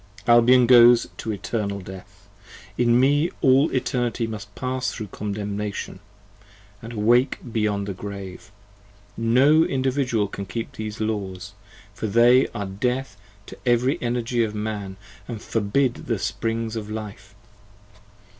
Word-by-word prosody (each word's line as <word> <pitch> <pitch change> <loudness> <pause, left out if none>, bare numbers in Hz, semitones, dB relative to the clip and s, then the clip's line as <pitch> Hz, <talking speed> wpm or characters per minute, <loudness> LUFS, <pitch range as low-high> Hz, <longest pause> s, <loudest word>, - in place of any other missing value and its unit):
Albion 120 +1 +6
goes 120 -1 +6
to 110 - -4
Eternal 100 -1 -3
Death: 95 +1 -12 0.5
In 120 0 +3
Me 145 +5 +3
all 135 +1 +4
Eternity 125 -2 -1
10 115 - -6
Must 105 -1 -8
pass 130 0 -2
thro' 110 - -6
condemnation, 105 0 -5 0.8
and 115 - -8
awake 120 +5 +2
beyond 105 -3 -1
the 100 - -3
Grave: 95 -1 -8 0.6
individual 130 -1 +2
can 100 0 -7
keep 115 +3 -5
these 110 0 -6
Laws, 105 -2 -4 0.4
for 110 - -4
they 120 +4 +5
are 100 - -5
death 125 +4 -2 0.3
To - - -11
every 125 +2 +1
energy 120 0 0
of 105 -1 -3
man, 105 -3 -4 0.3
and 115 -3 -6
forbid 115 +5 -1
the - - 0
springs 115 0 -3
of 105 -2 -5
life. 105 -2 -8
115 Hz, 125 wpm, -23 LUFS, 105-125 Hz, 0.8 s, Albion